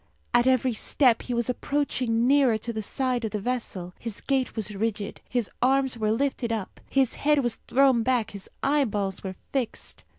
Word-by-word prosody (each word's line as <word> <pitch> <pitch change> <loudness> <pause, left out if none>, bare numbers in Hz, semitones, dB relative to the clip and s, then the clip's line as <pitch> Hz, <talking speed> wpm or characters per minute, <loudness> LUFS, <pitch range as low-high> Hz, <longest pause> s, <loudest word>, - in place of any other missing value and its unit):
At 240 +1 +4
every 255 -1 +3
step 240 +2 +3
he 250 - -4
was 235 -1 0
approaching 250 -3 0
nearer 265 -4 +4
to 235 +2 -5
the 220 - -3
side 250 +2 -1
of 220 - -1
the 210 - -3
vessel. 200 -6 -3
His 225 -3 -5
gait 265 -2 -1
was 215 -2 -3
rigid, 205 0 -3
his 245 -4 0
arms 265 0 +3
were 215 -2 0
lifted 245 0 0
up, 220 -4 -4
his 270 -3 +2
head 295 -1 +3
was 240 -2 -1
thrown 265 -3 +4
back, 240 -2 +1
his 200 -1 -9
eyeballs 210 -10 0
were 190 -1 -5 0.2
fixed. 260 -5 -3
240 Hz, 185 wpm, -26 LUFS, 220-265 Hz, 0.2 s, At